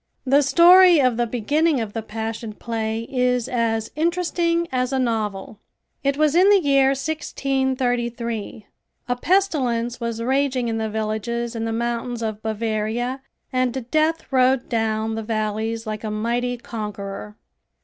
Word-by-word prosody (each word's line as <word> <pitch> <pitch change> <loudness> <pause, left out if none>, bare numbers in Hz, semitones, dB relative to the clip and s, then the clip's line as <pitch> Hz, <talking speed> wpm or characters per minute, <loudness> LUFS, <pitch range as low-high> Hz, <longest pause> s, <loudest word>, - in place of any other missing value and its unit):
The 275 +2 +4
story 350 +4 +7
of 255 -3 +3
the 240 0 +1
beginning 285 +6 +1
of 220 -3 -4
the 225 - -3
Passion 220 0 -5
Play 225 0 -3
is 250 -2 0
as 230 -3 -1
interesting 340 +1 0
as 255 0 0
a 265 - 0
novel. 215 -4 -2 0.4
It 275 0 +1
was 305 -1 +3
in 365 +4 +5
the 405 -1 +6
year 275 -4 +3
1633. 255 -6 -2 0.4
A 245 - 0
pestilence 250 -9 0
was 230 -1 -3
raging 260 0 0
in 225 0 -2
the 220 0 -2
villages 220 +2 -3
in 225 0 -2
the 225 - -2
mountains 235 +1 -2
of 215 -1 -3
Bavaria 220 +3 -2 0.3
and 255 -1 -1
death 315 +1 +1
rode 255 0 +3
down 220 -1 0
the 225 - -3
valleys 220 +1 -2
like 215 0 -5
a 215 - -3
mighty 240 +3 -1
conqueror. 210 -2 -6
240 Hz, 145 wpm, -22 LUFS, 225-270 Hz, 0.4 s, story